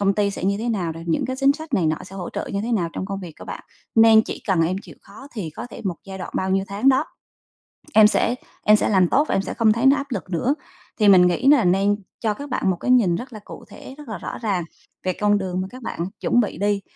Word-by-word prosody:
công 200 -1 +2
ty 205 -1 +1
sẽ 190 - -6
như 200 +1 +1
thế 235 +2 -3
nào 180 -7 -1
nè, 165 - -9
những 165 - 0
cái 260 0 -3
chính 275 +1 +4
sách 315 -2 -5
này 175 -6 +2
nọ 155 0 +1
sẽ 195 +1 -11
hỗ 180 - -5
trợ - - -4
như 200 - -1
thế 235 +1 -2
nào 175 -6 +1
trong 190 - -4
công 195 -1 -5
việc 175 -4 -8
các - - -11
bạn, - - -7 0.3
nên 225 -1 +7
chỉ - - -7
cần 180 -5 +2
em 180 +3 0
chịu - - -14
khó 275 - -13
thì 195 -9 -5
có 155 - -8
thể - - -9
một 180 -3 -2
giai 190 -1 -8
đoạn - - -6
bao 190 0 -1
nhiêu 195 0 +1
tháng 205 +7 +1
đó, 265 -1 +4 0.9
em 215 -1 +8
sẽ 230 +2 +2 0.3
em 210 - +6
sẽ - - 0
làm 185 -4 +3
tốt 290 +3 +3
và - - 0
em 195 - +1
sẽ - - -5
không 220 -2 +3
thấy 235 +4 0
nó 275 +2 +6
áp 280 0 -4
lực 195 -5 -5
nữa. 240 - +1 0.4
Thì 210 -2 +4
mình 180 -2 +7
nghĩ 180 +9 0
là 285 -7 +6
nên 195 +3 +3 0.2
cho 215 -2 0
các 285 +4 -8
bạn 195 - 0
một 185 - -1
cái 250 - -1
nhìn 215 -9 +4
rất 250 +6 -8
là 215 - -8
cụ - - -11
thể, 265 - -11
rất 295 -5 -11
là 210 -5 -5
rõ - - -6
ràng 195 -7 -1 0.4
về 185 - 0
con 205 0 +3
đường 185 -1 -3
mà 190 - -4
các 255 +1 -11
bạn 225 - -6 0.2
chuẩn 245 - +2
bị 210 - -2
đi, 205 0 +1
205 Hz, 295 wpm, -22 LUFS, 185-240 Hz, 0.9 s, em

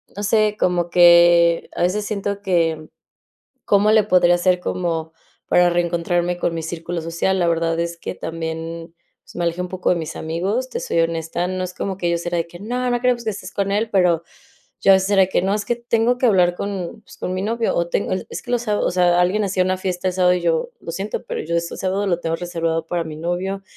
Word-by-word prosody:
no 205 - -5
sé, 210 0 +2
como 175 -3 +1
que 170 -1 +5
a - - -3
veces 200 +4 +1
siento 200 -1 -3
que, 165 -5 0 0.8
¿cómo 205 +1 +3
le 215 -1 +5
podría 180 -3 +4
hacer 180 0 +2
como 165 -3 -3 0.4
para 175 0 +5
reencontrarme 175 0 0
con 170 - -1
mi 165 - -3
círculo 170 +1 -5
social? 170 +3 -1
La 175 - +2
verdad 165 0 0
es 170 0 -3
que - - -6
también, 165 +1 -6 0.4
me 175 - -3
alejé 170 +1 -1
un 180 - -2
poco 185 0 -1
de 180 - +3
mis 160 -1 -5
amigos, 190 +11 -2
te - - -4
soy 165 - 0
honesta, 165 +1 -1
no 185 0 -2
es 180 0 -7
como 195 -1 -3
que 175 - -2
ellos 170 0 0
eran 175 -1 0
de - - -18
que 175 +1 -13
no, 250 +4 -2
no 245 0 0
queremos 245 -1 +1
que 220 - 0
estés 200 - -8
con 200 0 -1
él, 215 +2 0
pero 180 -5 +3 0.6
yo 195 - +6
a - - +8
veces 190 +1 +1
era 195 -2 +5
de 185 - +2
que: - - +2
"No, 195 +2 +1
es 210 -1 -2
que 240 - 0
tengo 235 0 +1
que 255 - +2
hablar 180 -5 +4
con 200 0 -5 0.2
con 185 - -3
mi 185 - -2
novio, 230 +2 -1
o 170 0 0
tengo - - -1
el" 185 - -2
Es - - -6
que 245 - -9
los 240 -1 +1
sa 210 -3 0
o - - +1
sea, 175 -1 +3
alguien 185 +4 +2
hacía 190 -2 +1
una 185 0 0
fiesta 185 -1 -3
el 185 - -1
sábado 180 -1 +4
y 180 - -2
yo: 165 -2 0
"Lo 165 - -7
siento, 195 +5 -4
pero - - -4
yo 170 +1 -2
ese 170 0 -3
sábado 195 +2 -1
lo 175 -2 0
tengo 165 -1 -1
reservado 165 -2 -2
para 175 0 -1
mi 155 -1 -7
novio", 180 +4 -3
180 Hz, 240 wpm, -21 LUFS, 170-200 Hz, 0.8 s, a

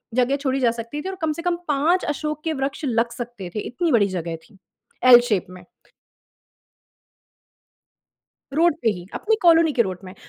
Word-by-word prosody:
जगह 255 +2 +2
छोड़ी 270 -1 -1
जा 240 -3 +3
सकती 235 +6 -6
थी 380 - -5
और 380 - -5
कम 315 -1 0
से 335 - -7
कम 350 0 0
5 305 +6 +2
अशोक 300 +1 -3
के 320 -1 -1
वृक्ष 275 +2 -3
लग 235 -1 0
सकते 240 -8 -7
थे, - - -1
इतनी 300 +9 -2
बड़ी 205 -4 +4
जगह 170 -3 -4
थी 195 - -22 0.5
एल 240 - +11
शेप 200 -5 +1
में। 180 -1 -12 2.9
रोड 335 0 +3
पे 225 - +3
ही, 180 -3 -7
अपनी 445 +1 0
कॉलोनी 330 -2 +5
के 245 -4 +3
रोड 185 -3 -5
में। 185 - -10
265 Hz, 180 wpm, -22 LUFS, 215-310 Hz, 2.9 s, एल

